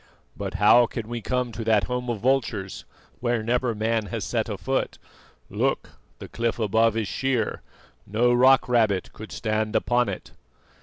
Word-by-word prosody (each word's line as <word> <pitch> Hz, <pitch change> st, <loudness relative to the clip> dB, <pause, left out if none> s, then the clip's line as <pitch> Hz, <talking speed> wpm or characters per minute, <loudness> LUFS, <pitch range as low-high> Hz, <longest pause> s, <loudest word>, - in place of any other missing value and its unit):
"But 100 Hz, -2 st, -5 dB
how 105 Hz, +4 st, +6 dB
can 115 Hz, -2 st, -6 dB
we 120 Hz, 0 st, -5 dB
come 125 Hz, +2 st, -1 dB
to 115 Hz, +1 st, -5 dB
that 110 Hz, -2 st, +3 dB
home 125 Hz, 0 st, -3 dB
of 115 Hz, -4 st, -3 dB
vultures, 115 Hz, -7 st, -1 dB, 0.3 s
where 120 Hz, -2 st, 0 dB
never 120 Hz, 0 st, 0 dB
man 110 Hz, 0 st, 0 dB
has -, -, -4 dB
set -, -, -2 dB
a -, -, -3 dB
foot? -, -, -2 dB, 0.5 s
Look, -, -, -1 dB, 0.3 s
the -, -, -9 dB
cliff 115 Hz, -1 st, -2 dB
above 110 Hz, 0 st, +2 dB
is 110 Hz, -3 st, -1 dB
sheer; 130 Hz, -3 st, -1 dB, 0.5 s
no 120 Hz, +4 st, +2 dB
rock 130 Hz, +2 st, +5 dB
rabbit 110 Hz, -6 st, +1 dB
could 110 Hz, +1 st, -10 dB
stand 110 Hz, -1 st, -2 dB
upon 120 Hz, 0 st, +2 dB
it." -, -, -7 dB
115 Hz, 165 wpm, -25 LUFS, 110-120 Hz, 0.5 s, how